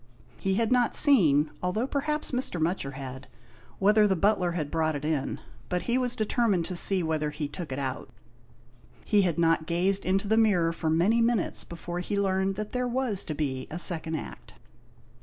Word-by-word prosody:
He 190 -1 -1
had 225 +2 0
not 245 -2 +2
seen, 160 - +5
although 180 +7 -1
perhaps 295 +2 -2
Mr. 250 -9 -1
Mutcher 160 -4 -2
had, 130 0 -8 0.5
whether 210 +2 +4
the 190 - +1
butler 185 -1 +1
had 155 -4 -4
brought 160 -1 0
it 145 +1 -5
in, 150 -3 -2 0.3
but 180 -1 -2
he 240 - -1
was 250 -1 0
determined 215 -5 0
to 180 - -4
see 185 +1 +6
whether 155 -2 -1
he 150 0 -5
took 160 +1 -8
it 130 - -4
out. 135 -2 -4 1.0
He 205 -1 +3
had 175 -5 0
not 165 -1 +1
gazed 185 +3 +1
into 195 +2 0
the 220 +2 +2
mirror 180 -7 +2
for 160 -1 -3
many 185 +9 +2
minutes 230 -4 0
before 175 +1 -7
he 200 +3 -2
learned 190 0 0
that 210 +1 -5
there 250 -1 -1
was 245 -5 -1
to 155 - -5
be 130 -4 -3
a 160 - -6
second 165 -2 -1
Act. - - -9
180 Hz, 190 wpm, -27 LUFS, 160-215 Hz, 1.0 s, see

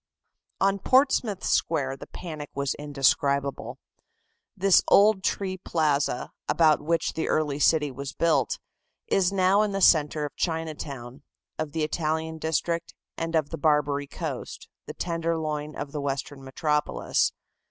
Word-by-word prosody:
On 195 +1 +2
Portsmouth 255 -5 +2
Square 135 -5 0
the - - -10
panic 155 -5 -7
was 140 -1 -1
indescribable. 140 -1 0 0.8
This 195 0 +5
old 200 -1 +5
tree 190 -1 -1
plaza, 150 -7 0 0.2
about 155 -2 +4
which 165 +2 0
the 160 - -2
early 150 -2 0
city 150 -1 +3
was 135 +1 -6
built, 165 +4 +1 0.5
is 190 -1 +2
now 195 +1 +3
in 210 -2 0
the 195 - -1
centre 150 -3 +4
of 145 - -8
Chinatown, 150 -6 -4 0.4
of 155 -2 -3
the 160 -1 -1
Italian 160 +1 -2
district 165 +1 -2 0.2
and 165 0 -3
of 155 -2 +1
the - - -5
"Barbary 145 -2 +1
Coast," - - -6 0.2
the - - -7
"Tenderloin" 160 -3 -2
of 145 -1 -5
the 150 - -4
Western 140 0 -4
metropolis. 150 +3 0
155 Hz, 135 wpm, -26 LUFS, 145-170 Hz, 0.8 s, This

